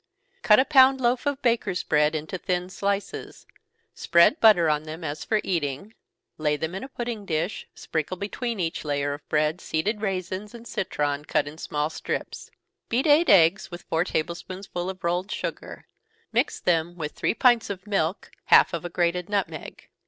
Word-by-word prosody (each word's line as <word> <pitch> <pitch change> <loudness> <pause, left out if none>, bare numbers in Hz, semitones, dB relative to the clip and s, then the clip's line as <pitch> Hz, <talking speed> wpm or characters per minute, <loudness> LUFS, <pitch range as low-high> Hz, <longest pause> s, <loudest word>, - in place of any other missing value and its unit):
_ - - -40
Cut 210 +1 +6
a 260 - +4
pound 265 -2 +6
loaf 245 +2 +1
of 285 -1 -2
bakers' 225 -6 +1
bread 150 +1 +2
into 155 +4 -4
thin 180 +1 -2
slices 200 +1 -3 0.5
spread 170 - +4
butter 210 -7 +6
on 150 -1 +1
them 155 +2 -8
as 150 -1 -4
for 215 - +1
eating 165 +3 -3 0.5
lay 150 -1 +1
them 160 +3 -4
in 190 - -5
a 265 - -8
pudding 235 -4 -5
dish 170 +1 -3
sprinkle 160 +3 -3
between 225 +3 -4
each 165 -2 -2
layer 145 -1 -1
of 145 - -11
bread 155 +3 +1
seeded 205 +7 -2
raisins, 195 +1 -3
and 235 0 -11
citron, 145 -5 -2
cut 150 - 0
in 155 +2 -9
small 150 0 -2
strips. - - -5 0.4
Beat 245 +3 +1
eight 310 +3 +5
eggs 180 0 +5
with 175 -1 -9
four 160 +1 0
table 170 -2 -2
spoonsful 185 0 -6
of 190 0 -8
rolled 175 +3 -1
sugar - - -5 0.5
mix - - 0
them 170 0 0
with 155 -3 -4
three - - -1
pints 240 -2 +3
of 190 -2 -6
milk, 195 -3 -1
half - - +6
of - - -3
a 175 - -4
grated 175 +1 -1
nutmeg. 180 -7 -4
180 Hz, 180 wpm, -25 LUFS, 160-210 Hz, 0.5 s, Cut